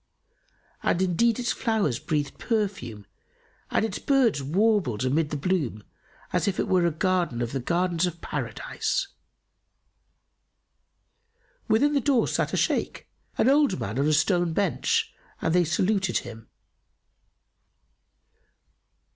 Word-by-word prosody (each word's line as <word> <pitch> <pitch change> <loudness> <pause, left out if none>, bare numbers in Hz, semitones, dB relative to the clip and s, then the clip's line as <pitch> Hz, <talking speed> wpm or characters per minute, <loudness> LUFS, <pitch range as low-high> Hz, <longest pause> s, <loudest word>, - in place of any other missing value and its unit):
And - - +1
indeed 190 +5 +2
its 245 -1 -1
flowers 210 - 0
breathed 150 -3 -2
perfume 200 - -2 0.6
and - - +1
its 215 - -4
birds 255 - +2
warbled 160 - +1
amid 150 +4 +1
the 150 - -3
bloom 145 - -1 0.5
as - - +1
it 195 - 0
were 180 -2 +3
a - - +1
garden 170 -5 0
of 120 -1 -2
the 135 - -2
gardens 175 +5 0
of 170 -1 -6
Paradise. - - -3 2.6
Within 285 +7 +3
the 280 - +2
door 260 -3 +2
sat - - -1
a - - -1
Shaykh, - - -1 0.3
an - - +3
old 280 -7 +3
man 105 +6 -3
on 140 - +2
a 155 - +3
stone 175 +2 +2
bench 190 -6 0 0.3
and 160 - 0
they 180 0 +4
saluted 185 +3 +1
him. 115 -2 -8
180 Hz, 125 wpm, -26 LUFS, 145-215 Hz, 2.6 s, they